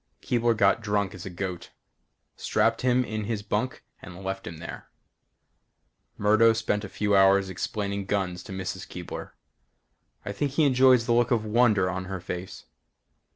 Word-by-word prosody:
Keebler 120 -2 +1
got 100 +2 +3
drunk 105 -2 -1
as 95 -1 -8
a - - -4
goat. 90 0 -5 0.7
Strapped 115 0 +1
him 125 0 +2
in 110 -2 -4
his 105 -2 -3
bunk 110 +5 -2 0.2
and 90 +2 -10
left 95 0 -4
him 85 - -7
there. 85 +1 -9 1.3
Murdo 110 +2 +5
spent 110 -2 -1
a 100 - -6
few 105 0 0
hours 95 0 +4
explaining 100 +1 -3
guns 95 -3 -1
to 100 - -11
Mrs. 95 -1 -5
Keebler. - - -7 0.9
I - - -3
think 140 +6 -2
he 155 - +3
enjoys 130 -3 +5
the 120 - +2
look 120 0 +3
of 115 -4 +1
wonder 105 -3 +3
on 95 0 -3
her 95 0 -5
face. 90 +1 -7
105 Hz, 160 wpm, -26 LUFS, 95-115 Hz, 1.3 s, Murdo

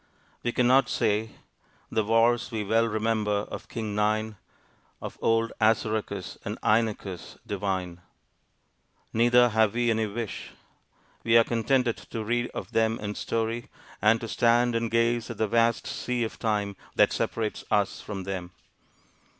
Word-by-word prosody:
We 120 - -1
cannot 125 +3 +4
say, 110 -1 0 0.6
The 110 - +1
wars 115 +2 +3
we 110 -3 -3
well 115 +3 +2
remember 110 -2 0
of - - -7
King 110 -3 -4
Nine, 110 +1 0 0.6
Of - - -8
old 115 0 +2
Assaracus 110 -3 0
and - - -4
Inachus 105 -5 0
divine. 95 -3 -3 1.1
Neither 120 +2 +5
have 110 -1 +2
we 120 -1 +2
any 110 -1 0
wish: 110 +1 -6 0.7
we 115 0 +5
are 115 - +7
contented 120 +1 +1
to 115 - -6
read 120 +2 0
of - - -6
them 115 0 +2
in 105 0 -4
story, 115 +2 -2 0.3
and 110 +2 +4
to 115 - -4
stand 120 +2 +3
and 115 0 0
gaze 115 0 +1
at 115 - -6
the 110 - +1
vast 115 +1 +2
sea 125 -4 -2
of 110 - -5
time 105 -3 -1 0.2
that - - +4
separates 110 -2 -2
us 100 -1 +1
from 100 -3 -6
them. 90 -2 -5
110 Hz, 145 wpm, -27 LUFS, 105-115 Hz, 1.1 s, are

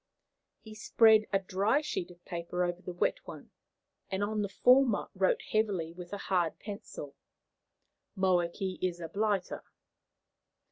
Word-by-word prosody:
He 220 - -11
spread 215 0 +4
a 195 - +4
dry 200 +8 +1
sheet 185 - -3
of 175 0 -17
paper 170 +1 -3
over 175 0 -2
the 180 - -6
wet 180 - 0
one, - - -10 0.6
and 190 +1 -1
on 210 +1 -1
the 200 - -2
former 250 +3 +4
wrote 190 -1 +1
heavily 195 -7 0
with 175 0 -10
a 205 - -3
hard 180 -4 0
pencil, 200 -9 -8 1.0
"Moakey 185 0 0
is 180 -2 -1
a 165 - -5
bliter." 205 0 -1
190 Hz, 140 wpm, -31 LUFS, 175-215 Hz, 1.0 s, spread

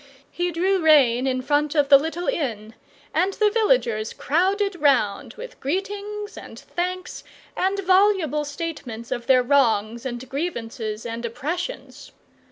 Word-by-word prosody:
He 350 0 -1
drew 370 +3 +1
rein 270 -6 +5
in 255 -1 -1
front 295 +2 +1
of 290 -2 +3
the 280 - +10
little 325 +4 -4
inn, 230 - -2 0.4
and 365 +5 +1
the 420 0 +2
villagers 405 - +1
crowded 385 +5 0
round 250 -9 +1
with - - -10
greetings 410 +6 -4
and - - -10
thanks 365 +1 -5 0.3
and 385 +2 0
voluble 370 -6 +3
statements 285 -7 -6
of 240 0 -3
their 255 -2 +5
wrongs 235 -4 +2
and 255 -1 -5
grievances 235 -7 -4
and 230 0 -5
oppressions. 330 - -5
300 Hz, 135 wpm, -23 LUFS, 240-370 Hz, 0.4 s, the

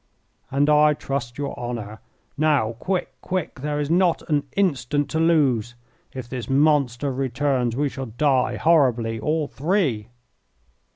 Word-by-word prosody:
"And 140 +2 +1
I 150 0 +5
trust 125 -4 -4
your 140 -1 -4
honour. 115 -3 -5 0.4
Now, 145 -7 +2
quick, 185 +4 -2
quick, 180 -6 -3
there 150 +2 -2
is 145 +1 -2
not 175 0 +2
an 145 -1 +1
instant 145 -6 0
to 160 - 0
lose! 135 -9 +2 0.4
If 130 -2 -7
this 125 0 -6
monster 140 -2 +2
returns 130 -2 -1
we 145 +3 +1
shall 135 -1 -6
die 130 +3 +1
horribly, 125 -9 +2
all 150 +5 -1
three." 145 - -1
140 Hz, 135 wpm, -23 LUFS, 120-150 Hz, 0.4 s, I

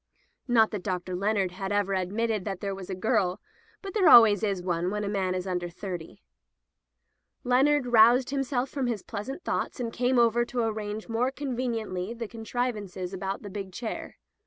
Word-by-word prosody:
Not 225 -3 +4
that 210 - -4
Dr. 180 -1 -3
Leonard 195 -1 0
had 190 +2 -5
ever 205 -1 +1
admitted 205 +3 -1
that 195 -2 -4
there 200 0 -3
was 190 -1 -8
a 190 - -2
girl, 190 -2 +1 0.4
but 390 - -6
there 390 -6 +5
always 220 -4 +8
is 195 -4 -1
one 175 0 0
when 210 +1 -2
a - - -2
man 190 -2 -1
is 185 0 -3
under 180 -2 -2
thirty. 175 -2 -7 1.2
Leonard 265 +3 +3
roused 245 +3 +5 0.4
from 270 -3 -1
his 225 -5 -2
pleasant 240 - -6
thoughts, - - -2
and 230 -2 -3
came 250 +1 +1
over 235 0 +4
to 240 0 -2
arrange 215 -1 -3
more 235 +2 +1
conveniently 235 -7 -3
the 230 -1 -5
contrivances 215 -5 -4
about 195 +2 -4
the 205 - -7
big 195 -1 -6
chair. 225 +5 -6
210 Hz, 175 wpm, -27 LUFS, 190-240 Hz, 1.2 s, always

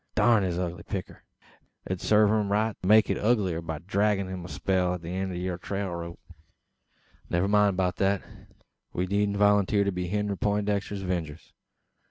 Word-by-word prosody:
Durn 115 -3 +4
his 90 -3 -1
ugly 90 -1 -3
picter! 95 +1 -6 0.6
It - - -10
would 95 - -3
sarve 105 -1 +4
him 105 -2 +1
right 110 +1 +1
to 90 - -3
make 110 +1 +6
it - - -1
uglier 100 -7 +1
by 80 -1 -5
draggin' 100 +3 0
him 95 -1 -5
a 90 - -9
spell 90 -2 0
at 90 - -9
the 85 - -6
eend 95 +1 -2
o' - - -5
yur 90 0 -3
trail 100 0 -3
rope. 85 0 -6 1.1
"Never 90 +3 +1
mind 105 -2 +3
beout 90 -1 0
that. 100 -1 +1 0.7
We 90 - -1
needn't 100 +1 0
volunteer 105 0 +3
to 100 - 0
be 90 -1 -3
Henry 105 +1 -1
Peintdexter's 100 -1 -1
'vengers. 85 -4 -4
95 Hz, 185 wpm, -27 LUFS, 90-105 Hz, 1.1 s, make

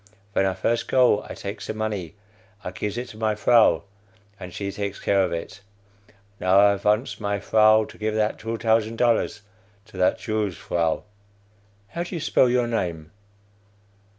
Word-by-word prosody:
Ven 95 - +2
I 95 - -1
first 115 0 -1
go, 125 -5 +3
I - - -6
takes 100 +2 -7
the 110 - -4
money, 105 -5 -4 0.5
I 90 - -5
gives 105 +3 -4
it 125 +1 -4
to 110 - -12
my 110 -1 0
vrow, 115 +2 +4 0.6
and 90 -2 -8
she 100 +2 -4
takes 100 0 -4
care 100 -1 +2
of 90 - -1
it. 100 +5 -6 0.8
Now 95 +1 +4
I 100 0 +5
vants 105 +5 0
my 100 -1 -1
vrow 110 +2 +4
to 110 - -14
give 110 0 -1
that 110 0 0
two 115 +1 -4
tousand 110 0 +1
dollars 115 -3 +1 0.4
to 110 -4 -14
that 90 0 +2
Jew's 110 -4 -2
vrow. 85 -2 -1 0.9
"(How 170 - -5
do 175 +1 -5
you - - -3
spell 140 -4 +3
your 125 0 +2
name?) 85 -9 -3
105 Hz, 175 wpm, -24 LUFS, 100-115 Hz, 0.9 s, I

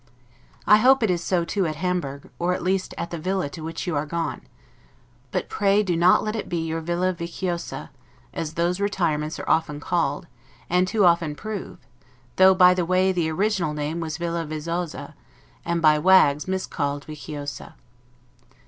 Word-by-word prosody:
I 210 - +7
hope 260 +3 +5
it 210 - +3
is 175 -1 -1
so, 175 -3 0
too, 190 0 0
at 155 - -3
Hamburg, 150 -5 -3
or 180 +1 +1
at - - -6
least 185 +1 -1
at 170 - -4
the 170 - -4
villa 185 -1 -1
to 160 - -9
which 165 +3 -5
you 175 -4 -2
are 145 +1 -1
gone; 170 +2 -3 0.9
but - - -2
pray 205 0 +2
do 180 -4 0
not 175 +2 +4
let 215 +1 -2
it 220 - -4
be 175 - -1
your 165 0 -2
'villa 175 +3 0
viciosa', 170 0 -5 0.4
as 160 -1 -4
those 175 +2 0
retirements 165 -6 -1
are - - -7
often 150 -2 +1
called, 170 +2 -1 0.5
and 180 +1 +3
too 205 0 +2
often 170 -3 +3
prove; 215 +2 -6 0.6
though, 190 0 +7
by 180 -1 +7
the 180 -1 0
way, 185 +2 +2
the 170 -3 0
original 180 -3 0
name 150 +3 -3
was 160 -2 -4
'villa 170 -1 -2
vezzosa'; 165 +2 -4 0.5
and 170 -1 -1
by 155 -1 +5
wags 150 -4 +4
miscalled 145 -6 -2
'viciosa'. 145 -1 -7
170 Hz, 175 wpm, -24 LUFS, 155-185 Hz, 0.9 s, I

